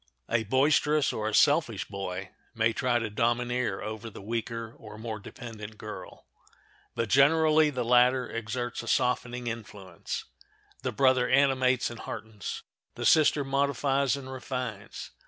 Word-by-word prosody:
A 115 Hz, -1 st, +1 dB
boisterous 150 Hz, +4 st, +3 dB
or 110 Hz, 0 st, -2 dB
a 110 Hz, -, -1 dB
selfish 145 Hz, -, +3 dB
boy 95 Hz, -2 st, -5 dB, 0.2 s
may 115 Hz, 0 st, +2 dB
try 125 Hz, +1 st, +1 dB
to 115 Hz, -2 st, -1 dB
domineer 120 Hz, -1 st, 0 dB
over 110 Hz, +2 st, -5 dB
the -, -, -11 dB
weaker 115 Hz, +2 st, -4 dB
or 105 Hz, -1 st, -11 dB
more 110 Hz, -1 st, -5 dB
dependent 110 Hz, 0 st, -9 dB
girl. 105 Hz, 0 st, -9 dB, 0.7 s
But 115 Hz, -, -1 dB
generally 155 Hz, +4 st, +5 dB
the 125 Hz, -4 st, -3 dB
latter 125 Hz, +2 st, +4 dB
exerts 120 Hz, +2 st, -4 dB
a -, -, -10 dB
softening 125 Hz, -1 st, 0 dB
influence. 105 Hz, -6 st, -6 dB, 0.6 s
The -, -, -2 dB
brother 130 Hz, -2 st, +3 dB
animates 130 Hz, -2 st, +3 dB
and 115 Hz, -, -9 dB
heartens; 110 Hz, -3 st, -6 dB, 0.3 s
the -, -, -4 dB
sister 150 Hz, -2 st, +5 dB
modifies 140 Hz, 0 st, +1 dB
and 130 Hz, -1 st, -8 dB
refines. 125 Hz, -5 st, -5 dB
120 Hz, 135 wpm, -28 LUFS, 110-135 Hz, 0.7 s, generally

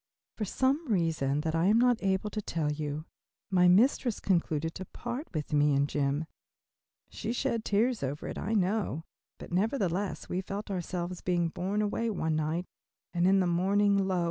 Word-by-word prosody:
For 215 Hz, -, -2 dB
some 270 Hz, -, +1 dB
reason 155 Hz, -6 st, +1 dB
that 160 Hz, 0 st, -2 dB
I 165 Hz, +1 st, +2 dB
am 215 Hz, +3 st, +5 dB
not 245 Hz, -1 st, +3 dB
able 195 Hz, +1 st, 0 dB
to 215 Hz, -, -3 dB
tell 160 Hz, -6 st, -1 dB
you, 150 Hz, +1 st, -4 dB, 0.5 s
my 180 Hz, -1 st, +5 dB
mistress 230 Hz, +4 st, +4 dB
concluded 165 Hz, -4 st, 0 dB
to 190 Hz, -, -6 dB
part 240 Hz, -, -5 dB
with 150 Hz, -3 st, -4 dB
me 145 Hz, -1 st, +4 dB
and 140 Hz, +1 st, +2 dB
Jim. 145 Hz, +2 st, 0 dB, 0.9 s
She 220 Hz, -, -4 dB
shed 240 Hz, -2 st, -1 dB
tears 225 Hz, +3 st, +1 dB
over 140 Hz, +2 st, -3 dB
it, -, -, -5 dB
I 220 Hz, +3 st, -2 dB
know, 195 Hz, -4 st, 0 dB, 0.3 s
but -, -, -10 dB
nevertheless 195 Hz, -1 st, 0 dB
we 180 Hz, -, -2 dB
felt 200 Hz, +2 st, -5 dB
ourselves 180 Hz, -1 st, -3 dB
being 175 Hz, -2 st, +1 dB
borne 195 Hz, +5 st, -1 dB
away 225 Hz, +2 st, -1 dB
one 160 Hz, -7 st, -1 dB
night, 155 Hz, +3 st, -1 dB, 0.5 s
and 175 Hz, 0 st, +2 dB
in 195 Hz, 0 st, +5 dB
the -, -, +2 dB
morning, 200 Hz, +4 st, +3 dB
lo! 185 Hz, -2 st, +1 dB
185 Hz, 175 wpm, -30 LUFS, 160-210 Hz, 0.9 s, am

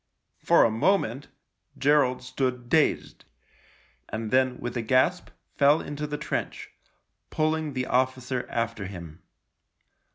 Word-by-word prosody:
For -, -, +5 dB
a 115 Hz, -, +3 dB
moment 135 Hz, -, 0 dB, 0.5 s
Gerald 140 Hz, -3 st, +2 dB
stood 125 Hz, -1 st, -3 dB
dazed, 155 Hz, 0 st, +1 dB, 0.9 s
and 110 Hz, 0 st, -4 dB
then 130 Hz, -1 st, +2 dB
with 120 Hz, 0 st, -5 dB
a 120 Hz, -, -1 dB
gasp 130 Hz, +10 st, +1 dB, 0.3 s
fell 145 Hz, +2 st, +5 dB
into 145 Hz, +1 st, -5 dB
the 150 Hz, 0 st, -4 dB
trench, 150 Hz, -, -4 dB, 0.6 s
pulling 155 Hz, -1 st, -1 dB
the 130 Hz, -1 st, -2 dB
officer 130 Hz, 0 st, -1 dB
after 115 Hz, -4 st, -3 dB
him. 85 Hz, -5 st, -10 dB
130 Hz, 120 wpm, -26 LUFS, 120-145 Hz, 0.9 s, For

